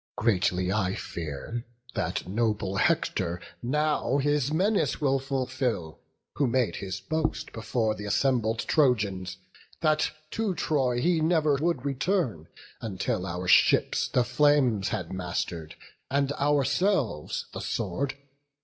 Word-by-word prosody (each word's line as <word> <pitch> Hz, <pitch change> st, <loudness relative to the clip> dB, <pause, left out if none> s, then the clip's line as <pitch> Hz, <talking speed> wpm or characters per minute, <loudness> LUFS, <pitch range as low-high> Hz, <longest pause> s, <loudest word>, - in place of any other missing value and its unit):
Greatly 95 Hz, -4 st, +1 dB
I 95 Hz, -3 st, 0 dB
fear 85 Hz, -, -5 dB, 0.3 s
that -, -, -2 dB
noble 105 Hz, -2 st, 0 dB
Hector 85 Hz, -2 st, +1 dB, 0.2 s
now 150 Hz, 0 st, +1 dB
His 145 Hz, 0 st, +1 dB
menace 195 Hz, +6 st, +1 dB
will 135 Hz, -3 st, +2 dB
fulfil, 130 Hz, -, -2 dB, 0.4 s
who 140 Hz, -, +3 dB
made 125 Hz, -1 st, +1 dB
his 95 Hz, -1 st, -4 dB
boast 155 Hz, +5 st, -2 dB
Before 115 Hz, 0 st, 0 dB
th' -, -, -11 dB
assembled 115 Hz, 0 st, +1 dB
Trojans, 100 Hz, -, +1 dB, 0.4 s
that 155 Hz, -1 st, +2 dB, 0.2 s
to 220 Hz, -5 st, -1 dB
Troy 130 Hz, -7 st, +1 dB
He 165 Hz, +3 st, +2 dB
never 155 Hz, -2 st, +3 dB
would 150 Hz, -3 st, -1 dB
return, 135 Hz, -, 0 dB, 0.3 s
until 95 Hz, -3 st, -2 dB
our 90 Hz, +1 st, -4 dB
ships -, -, +4 dB
The 125 Hz, -, +2 dB
flames 130 Hz, -5 st, +3 dB
had 90 Hz, -2 st, -3 dB
master'd, 85 Hz, -3 st, -4 dB, 0.3 s
and 140 Hz, 0 st, +1 dB
ourselves 145 Hz, -, +1 dB
the -, -, -5 dB
sword. 140 Hz, -1 st, -2 dB
125 Hz, 120 wpm, -27 LUFS, 95-145 Hz, 0.4 s, ships